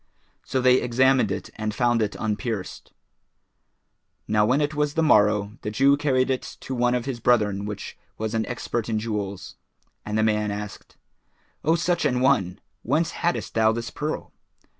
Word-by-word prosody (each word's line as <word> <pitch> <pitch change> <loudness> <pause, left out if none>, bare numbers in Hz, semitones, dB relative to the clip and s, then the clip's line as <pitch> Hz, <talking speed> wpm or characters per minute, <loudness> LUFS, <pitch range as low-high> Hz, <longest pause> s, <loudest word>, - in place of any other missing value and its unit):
So 130 - -1
they 125 0 +5
examined 125 -2 +3
it 95 - -5
and 110 -1 -3
found 120 -2 +2
it 105 -1 -1
unpierced. 110 -3 -4 1.4
Now 105 0 +3
when 130 +4 +3
it 150 0 0
was 150 -1 -1
the 165 - +2
morrow, 105 -5 +3
the - - -3
Jew 135 +6 +4
carried 135 -2 +1
it 130 - 0 0.2
to 130 - -5
one 125 0 +2
of 125 -1 -2
his 130 -3 -4
brethren 105 -4 +2
which 105 -1 -6 0.2
was 110 0 -3
an 110 -1 -1
expert 120 -2 -3
in 110 - 0
jewels, 105 -3 -4 0.5
and 105 0 -3
the 110 - +2
man 105 -1 +1
asked, 105 0 -7 0.7
"O 160 +2 +3
such 175 +1 0
an 125 -4 +1
one! 105 -9 +2 0.2
whence 155 +7 0
haddest 175 +1 -2
thou 110 -1 +4
this 115 0 -4
pearl?" 150 +1 -4
115 Hz, 170 wpm, -24 LUFS, 105-130 Hz, 1.4 s, they